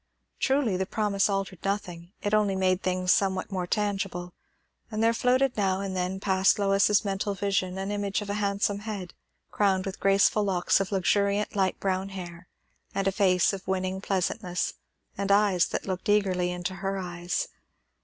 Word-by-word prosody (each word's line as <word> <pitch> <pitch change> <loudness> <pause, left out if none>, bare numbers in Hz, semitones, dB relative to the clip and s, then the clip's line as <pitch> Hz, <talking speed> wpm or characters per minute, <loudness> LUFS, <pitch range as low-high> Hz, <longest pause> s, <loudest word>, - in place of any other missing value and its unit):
Truly 265 -8 +2
the 190 0 -2
promise 205 -2 +1
altered 195 -3 -3
nothing, 180 -3 -3
it 205 - -1
only 210 -2 +3
made 185 0 +1
things 185 0 +2
somewhat 190 0 0
more 185 -2 -2
tangible; 195 -3 -2 0.6
and 215 -1 -1
there 230 0 +4
floated 250 +2 +2
now 195 -2 +1
and 195 -1 -4
then 185 +1 -2
past 190 -1 +3
Lois's 200 +1 +3
mental 200 +1 -1
vision 190 -1 -1
an 195 +1 -3
image 205 0 -1
of - - -9
a 210 +1 -2
handsome 200 0 0
head, 205 -4 -6 0.4
crowned 190 -2 +1
with 195 -1 -5
graceful 195 +2 +3
locks 185 -3 +2
of 195 0 -2
luxuriant 200 +2 +1
light 190 -2 +1
brown 190 0 -1
hair, 180 -2 -8 0.5
and 195 0 0
a - - +3
face 185 -2 +3
of 195 -1 -7
winning 190 0 -1
pleasantness, 185 -1 -1 0.5
and 200 0 0
eyes 200 -3 +4
that - - -4
looked 185 +1 -3
eagerly 190 -4 +2
into 180 +1 -3
her 195 +1 -2
eyes. 175 - -3
195 Hz, 170 wpm, -27 LUFS, 185-205 Hz, 0.6 s, there